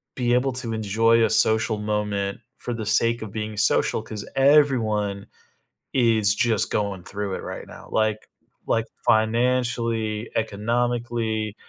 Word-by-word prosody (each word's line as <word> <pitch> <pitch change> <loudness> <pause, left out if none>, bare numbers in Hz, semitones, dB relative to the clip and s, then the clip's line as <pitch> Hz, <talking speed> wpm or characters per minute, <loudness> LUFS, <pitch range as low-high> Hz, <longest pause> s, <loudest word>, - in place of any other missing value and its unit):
be 120 -2 +1
able 130 +2 +2
to 120 -3 -2
enjoy 115 +2 +3
a 110 - +3
social 110 0 +2
moment 105 -1 -2 0.2
for 120 - -5
the 110 -2 -4
sake 115 +3 +2
of 110 -3 -6
being 110 0 -4
social 105 - +2
'cause 110 -2 -7
everyone 115 -8 +3 0.7
is 110 -5 +3
just 115 -3 +1
going 100 -4 -2
through 100 -1 -4
it - - -6
right - - -7
now, - - -12
like 110 -1 0 0.4
like, 115 - +2 0.2
financially, 115 -1 +1
economically, 115 0 -1
110 Hz, 135 wpm, -24 LUFS, 105-120 Hz, 0.7 s, enjoy